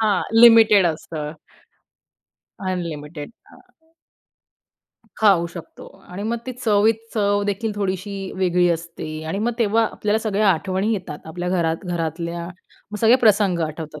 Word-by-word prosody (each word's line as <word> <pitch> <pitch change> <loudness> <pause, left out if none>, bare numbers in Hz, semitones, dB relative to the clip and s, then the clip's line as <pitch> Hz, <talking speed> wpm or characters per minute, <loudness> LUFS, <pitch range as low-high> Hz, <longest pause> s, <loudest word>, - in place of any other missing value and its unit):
हां 210 -4 +2 0.2
लिमिटेड 225 -5 +7
असतं. 155 -1 -4 1.4
अनलिमिटेड 155 -2 -5 1.9
खाऊ 190 -6 +4
शकतो 170 -1 -11 0.2
आणि 185 +3 -7
मग 230 +2 -1
ती 255 - -4
चवीत 220 -3 +2 0.2
चव 205 -2 +1
देखील 210 +2 -2
थोडीशी 200 0 -3 0.2
वेगळी 180 -1 +2
असते 165 -1 -4 0.2
आणि 195 - -2
मग 230 +3 0
तेव्हा 225 0 +2
आपल्याला 210 +1 0
सगळ्या 215 -2 +1
आठवणी 190 +5 -1
येतात. 180 -8 -5
आपल्या 175 +2 -5
घरात 170 0 -1
घरातल्या, 170 0 -4 0.4
मग 210 - -6
सगळे 230 +3 +6
प्रसंग 200 -4 +3
आठवतात. 155 -1 -8
190 Hz, 125 wpm, -21 LUFS, 170-210 Hz, 1.9 s, लिमिटेड